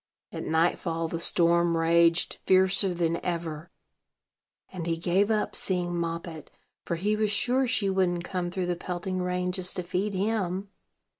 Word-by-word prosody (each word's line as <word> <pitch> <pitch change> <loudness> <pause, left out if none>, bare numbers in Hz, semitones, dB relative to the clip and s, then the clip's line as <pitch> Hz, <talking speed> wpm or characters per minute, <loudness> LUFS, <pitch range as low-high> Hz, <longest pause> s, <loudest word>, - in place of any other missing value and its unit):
At - - -5
nightfall 165 +1 +1
the 165 - -3
storm 170 0 +3
raged 170 +1 +3
fiercer 190 +1 +4
than 170 -1 -1
ever, 170 -2 -4 1.0
and 175 -3 -5
he 165 -1 0
gave 180 +5 +1
up 215 -1 0
seeing 180 -2 -1
Moppet; 170 -2 -4 0.3
for 170 - -2
he 205 +5 0
was 215 0 +1
sure 250 +5 +1
she 225 -5 +1
wouldn't 185 -2 +1
come 180 -1 -3
through 180 0 -2
the 175 0 -1
pelting 180 +1 -4
rain 180 0 -1
just 180 0 -3
to 180 - -2
feed 190 +4 -2
him. 195 -1 -1
180 Hz, 155 wpm, -27 LUFS, 170-190 Hz, 1.0 s, fiercer